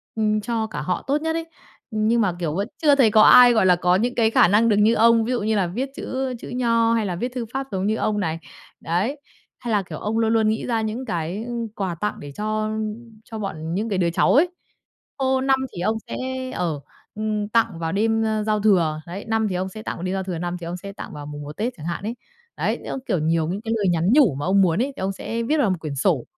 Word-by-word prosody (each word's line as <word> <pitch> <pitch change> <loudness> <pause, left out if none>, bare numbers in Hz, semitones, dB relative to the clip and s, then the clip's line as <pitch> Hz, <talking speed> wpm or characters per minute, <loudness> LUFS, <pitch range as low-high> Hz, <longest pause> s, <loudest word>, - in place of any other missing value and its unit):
ưm, 215 -1 +1
cho 225 -1 -2
cả - - -5
họ 180 - -2
tốt 290 +2 +1
nhất 320 0 -1
ấy. 330 - -2 0.5
Nhưng 220 +2 +2
mà, 185 -4 +1
kiểu, 160 -2 -2
vẫn 200 +3 -1
chưa 295 -3 +5
thấy 255 -6 +4
có 215 0 +6
ai, 245 +1 +8
gọi 220 - +3
là, 180 -1 +6
có 180 +1 +2
những 240 +6 0
cái 225 -2 +3
khả - - +5
năng 215 +5 +4
được 210 - +4
như 210 +2 +4
ông, 230 0 +5
ví 245 - -2
dụ 245 - 0
như 215 +1 0
là 190 -4 +1
viết 250 +10 -3
chữ 260 0 -3
chữ - - -9
Nho 230 -2 +2
hay 225 -2 +1
là 180 - -2
viết 245 +8 -3
thư 240 - -2
pháp 270 0 -3
giống 190 +1 -1
như 215 - +1
ông 210 -1 0
này, 165 -3 -2 0.4
đấy, 200 - -1 0.4
hay 240 -2 -4
là, 210 -2 +3
kiểu, 180 - -8
ông 220 +2 -2
luôn 225 0 +2
luôn 220 -1 +3
nghĩ 220 - -1
ra 230 -2 0
những 220 +4 -3
cái, 175 0 -3
ư, 240 - -5 0.2
quà 185 -4 -2
tặng 210 +5 -2
để 145 -1 -8
cho 215 +4 -2 0.6
cho 225 -2 -7
bọn 165 -5 -4
những 210 +5 -1
cái 200 - -1
đứa 175 -2 +2
cháu 170 - +2
ấy. 340 +5 +5 0.7
Ô, 265 -1 +1
năm 270 0 +3 0.2
thì 175 - -5
ông 220 +4 +1
sẽ, - - -5 0.4
ờ, 170 - -2 0.4
ưm, 215 -1 -2
tặng 220 -6 +1
vào 165 -1 -2
đêm, 225 +3 +1
a, 215 -1 0
giao 215 0 +1
thừa, 170 -7 +2
đấy, 185 +4 -7
năm 225 -1 +1
thì 190 - -3
ông 185 +1 -2
sẽ 215 +3 -9
tặng 175 - -5
đêm 185 +1 -2
giao 190 - -2
thừa 185 -2 -4
năm 175 +1 -3
thì 170 - -7
ông 175 +2 -4
sẽ 200 +2 -8
tặng - - -8
vào 145 -1 -7
mùng 145 0 -7
1 145 +1 -9
Tết 235 +4 -1
chẳng 155 - -9
hạn 170 +3 -4
ấy. 225 +3 -3 0.4
Đấy, - - -1
xong, - - -3
kiểu, 190 -8 +1
nhiều 160 +1 +1
những 190 +5 -3
cái 225 0 -2
lời 200 -3 +1
nhắn 170 0 +1
nhủ 265 - +5
mà 145 - -3
ông 195 +2 +4
muốn 180 +2 +2
ấy, 275 +2 -1
thì - - -11
ông 190 +1 0
sẽ 230 +4 -4
viết 300 +7 +1
vào 270 -9 +2
một 185 - 0
quyển 150 -3 -5
sổ, - - +1
215 Hz, 275 wpm, -23 LUFS, 180-230 Hz, 0.7 s, ai